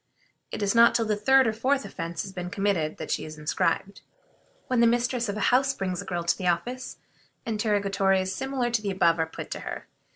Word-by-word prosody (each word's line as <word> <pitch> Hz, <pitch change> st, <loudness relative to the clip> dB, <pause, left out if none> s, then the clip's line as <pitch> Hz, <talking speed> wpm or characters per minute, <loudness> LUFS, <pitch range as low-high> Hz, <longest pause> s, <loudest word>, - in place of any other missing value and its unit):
It -, -, -4 dB
is 200 Hz, -, +1 dB
not 235 Hz, 0 st, +6 dB
till 230 Hz, -, +2 dB
the 215 Hz, -1 st, +1 dB
third 265 Hz, +6 st, +4 dB
or 220 Hz, -, +1 dB
fourth 265 Hz, +4 st, 0 dB
offense 170 Hz, -3 st, -5 dB
has 195 Hz, -, -8 dB
been 180 Hz, -1 st, -5 dB
committed 185 Hz, -5 st, -1 dB
that 160 Hz, -, -6 dB
she -, -, -1 dB
is 155 Hz, 0 st, -8 dB
inscribed. 165 Hz, +5 st, -1 dB, 0.6 s
When 255 Hz, -2 st, 0 dB
the 235 Hz, -, +6 dB
mistress 240 Hz, 0 st, +1 dB
of 205 Hz, -, -3 dB
a 210 Hz, -, +2 dB
house 270 Hz, +1 st, +3 dB
brings 185 Hz, -2 st, -3 dB
a -, -, -10 dB
girl 175 Hz, -2 st, -3 dB
to 170 Hz, -, +2 dB
the 185 Hz, -, -2 dB
office, 245 Hz, +9 st, -2 dB, 0.5 s
interrogatories 200 Hz, -3 st, +1 dB
similar 265 Hz, +1 st, -2 dB
to 235 Hz, -2 st, +1 dB
the 205 Hz, -, -2 dB
above 170 Hz, -3 st, +2 dB
are 160 Hz, -, +1 dB
put -, -, -8 dB
to -, -, -4 dB
her. -, -, -6 dB
205 Hz, 220 wpm, -26 LUFS, 180-235 Hz, 0.6 s, not